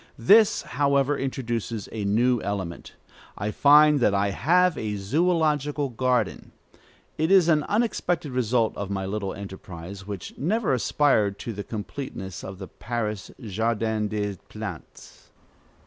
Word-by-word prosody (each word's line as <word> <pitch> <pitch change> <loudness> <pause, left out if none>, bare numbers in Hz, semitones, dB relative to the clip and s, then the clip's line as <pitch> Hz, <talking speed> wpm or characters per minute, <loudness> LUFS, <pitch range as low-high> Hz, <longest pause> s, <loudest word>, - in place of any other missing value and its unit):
This, 205 - +5
however, 140 +1 +1
introduces 120 -5 -3
a 105 -2 -4
new 120 +4 +2
element. 95 -4 -5 0.4
I 105 +2 -2
find 150 +3 +6
that 105 -5 +3
I 100 0 +1
have 180 - +3
a 110 -5 -3
zoölogical 150 - 0
garden. 125 -4 0 0.7
It 160 +1 +1
is 190 -3 +6
an 155 -3 +4
unexpected 180 - -1
result 120 -2 +1
of 100 -1 -5
my 95 -1 -2
little 100 0 -3
enterprise, 95 -1 -9
which 100 -4 -7
never 190 - +1
aspired 115 -5 +2
to 115 - -5
the 100 0 -5
completeness 105 -4 -6
of 95 0 -7
the 95 0 -8
Paris 105 -4 -4
"Jardin 110 0 -1
des 105 -2 -3
Plantes." - - -9
115 Hz, 130 wpm, -25 LUFS, 100-145 Hz, 0.7 s, find